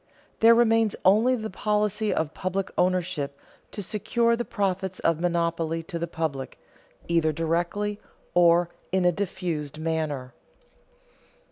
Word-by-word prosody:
There 230 +1 +7
remains 225 -2 +3
only 220 +7 +5
the 220 -3 -5
policy 210 +1 0
of 160 -1 -1
public 185 +1 -3
ownership 180 -6 0 0.3
to 205 - -6
secure 230 +4 +1
the 240 - -2
profits 190 -4 -2
of 165 -1 +2
monopoly 170 -1 0
to 170 0 -5
the 170 - -2
public, 155 -5 -4 0.5
either 165 -2 +2
directly 170 +6 -1 0.3
or 175 0 +4 0.2
in 185 -1 +2
a 180 - +5
diffused 170 -6 -3
manner. 155 -5 -2
180 Hz, 125 wpm, -26 LUFS, 165-205 Hz, 0.5 s, There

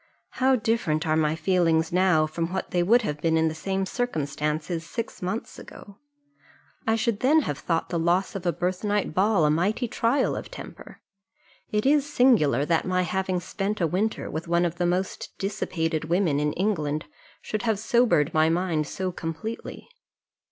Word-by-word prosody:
How 260 +1 +5
different 220 -10 0
are 155 -1 +2
my 155 0 +2
feelings 165 -1 +2
now 180 -4 +4
from 165 +2 -3
what 190 - -3
they 175 - +2
would 230 +7 +4
have 150 -6 -3
been 160 0 +2
in 160 0 +2
the - - -4
same 190 +4 -2
circumstances 155 - -2
six 230 +8 -6
months 185 +5 -4
ago! 200 +1 -13 0.9
I 225 - +3
should 225 -1 0
then 300 +5 +4
have 145 - -3
thought 165 -2 -1
the 170 - -1
loss 175 +3 +1
of 195 - -5
a - - +4
birthnight 185 +3 -1
ball 190 -2 +3
a 150 - +3
mighty 200 - 0
trial 240 +4 +1
of - - -6
temper. - - -11 0.7
It 210 +2 0
is 290 +1 +3
singular, 155 - +4
that 165 0 +1
my 185 0 +1
having 185 +1 -1
spent 200 +3 -3
a 175 - +2
winter 195 +7 -1
with 160 +2 -5
one 170 +1 +2
of 170 0 -3
the 175 - +2
most 185 +2 -3
dissipated 165 -5 -2
women 170 -3 +1
in 150 0 0
England 155 -7 -1 0.3
should 215 - -4
have 225 -3 +1
sobered 220 - +2
my 155 0 +4
mind 165 -3 0
so 185 -1 -3
completely. 170 +7 -6
180 Hz, 175 wpm, -25 LUFS, 160-210 Hz, 0.9 s, How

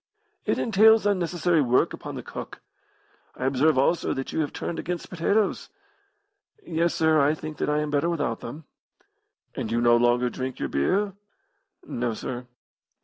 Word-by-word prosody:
"It - - +2
entails 220 0 +5
unnecessary 175 -4 +1
work 125 -2 +2
upon - - -7
the - - -6
cook. - - -8 0.8
I - - -4
observe, 135 +3 +3
also, 140 +6 +2
that 135 - -5
you - - -1
have 150 -2 -1
turned 165 - -4
against 175 0 -5
potatoes." 195 +4 0 1.0
"Yes, 170 0 0
sir; 160 -2 +3
I 145 +2 +3
think 155 0 -7
that - - -1
I 150 0 +1
am 150 -1 -3
better 145 +3 +1
without 145 -9 -1
them." 145 +7 -8 0.9
"And 110 - -4
you 115 - +1
no 120 0 +5
longer 120 +1 +2
drink 130 0 -4
your - - -3
beer?" 195 - +1 0.7
"No, 120 -2 -2
sir." 125 +2 -6
150 Hz, 160 wpm, -25 LUFS, 125-175 Hz, 1.0 s, entails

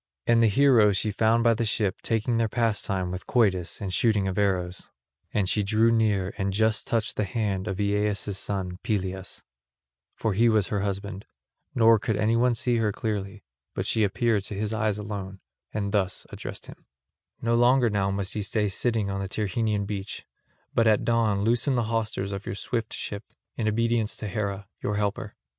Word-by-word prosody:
And 115 0 +4
the 115 - +5
heroes 110 -4 +5
she 105 - 0
found 110 +3 +2
by 115 0 +5
the 115 +1 -1
ship 105 -3 -1
taking 115 +1 0
their 115 -1 +1
pastime 100 -5 0
with 90 +1 -6
quoits 95 -8 +1
and 95 -3 -4
shooting 105 -3 +2
of 95 +1 -1
arrows; 90 -3 -1 0.4
and 105 -4 0
she 105 - +1
drew 110 +3 +3
near 105 -4 +1
and 95 0 0
just 110 +1 +1
touched 115 -2 -1
the - - +1
hand 100 -1 -2
of 95 0 -3
Aeaeus' 105 0 0
son 95 -2 -4
Peleus, 95 -3 -3 0.7
for 110 -3 -1
he 115 +4 +4
was 110 -3 +2
her 100 -2 -1
husband; 100 0 -4 0.5
nor 115 -1 +6
could 110 -2 -1
anyone 115 +3 +2
see 120 +1 +1
her 110 -2 +1
clearly, 100 -1 -4 0.3
but - - -2
she 110 - +2
appeared 105 0 +1
to 100 - -6
his 105 +2 -2
eyes 110 -1 0
alone, 100 -2 -6 0.3
and 100 -2 -2
thus 100 -2 0
addressed - - -7
him: - - -14 0.5
"No 115 0 0
longer 120 +1 +4
now 100 -1 +1
must 100 0 -2
ye 105 - -1
stay 105 0 0
sitting 110 0 0
on 100 0 -2
the 95 - -3
Tyrrhenian 105 0 -1
beach, 100 -1 -5 0.5
but 115 -1 +3
at 110 -1 +3
dawn 110 -4 +2
loosen 120 +5 +2
the 120 - +1
hawsers 105 -3 -1
of 100 0 -6
your - - -3
swift 115 +1 -3
ship, 100 +1 -5 0.3
in 110 - -1
obedience 115 0 +1
to 105 - -5
Hera, 100 0 -3
your 105 - -1
helper. 105 0 -2
105 Hz, 185 wpm, -26 LUFS, 100-115 Hz, 0.7 s, nor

